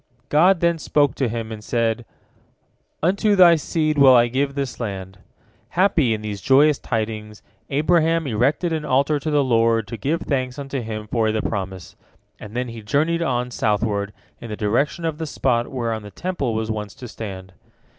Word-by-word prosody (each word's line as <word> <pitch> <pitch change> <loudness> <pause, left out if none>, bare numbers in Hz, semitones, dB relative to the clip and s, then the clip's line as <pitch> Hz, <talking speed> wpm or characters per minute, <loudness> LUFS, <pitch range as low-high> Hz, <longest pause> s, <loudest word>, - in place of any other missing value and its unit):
God 175 +4 +4
then 170 -1 +2
spoke 145 -4 +2
to 130 -4 -1
him, 115 0 -4
and 110 -1 -7
said, 115 0 -1 1.0
"Unto 200 +4 +2
thy 175 -3 +7
seed 155 -1 -1
will 135 -2 +8
I 120 0 +5
give 140 +3 -1
this 140 -3 -3
land." 95 -4 -5 0.5
Happy 170 - +2
in 105 - -8
these 105 -2 -5
joyous 140 +2 +4
tidings, 110 -1 -4 0.3
Abraham 165 +2 +2
erected 140 +8 0
an 155 -1 -2
altar 140 +2 +1
to 155 - -4
the 145 -2 +3
Lord 115 -3 +2
to 115 - -5
give 150 - -1
thanks 130 -2 -2
unto 135 -2 -4
Him 110 -2 -5
for 110 0 0
the 110 0 -1
promise, 95 -4 -5 0.4
and 105 +1 -10
then 125 0 -2
he 115 -1 -8
journeyed 155 +10 0
on, 125 -5 -1
southward, 105 -2 0 0.3
in 120 - -9
the 105 - -5
direction 135 +10 0
of 160 -1 -2
the 160 - -3
spot 120 -4 0
whereon 115 -4 -3
the 105 - -10
Temple 175 - -3
was 110 0 -2
once 105 -2 -5
to 125 - -9
stand. 95 -4 -8
125 Hz, 180 wpm, -22 LUFS, 110-150 Hz, 1.0 s, will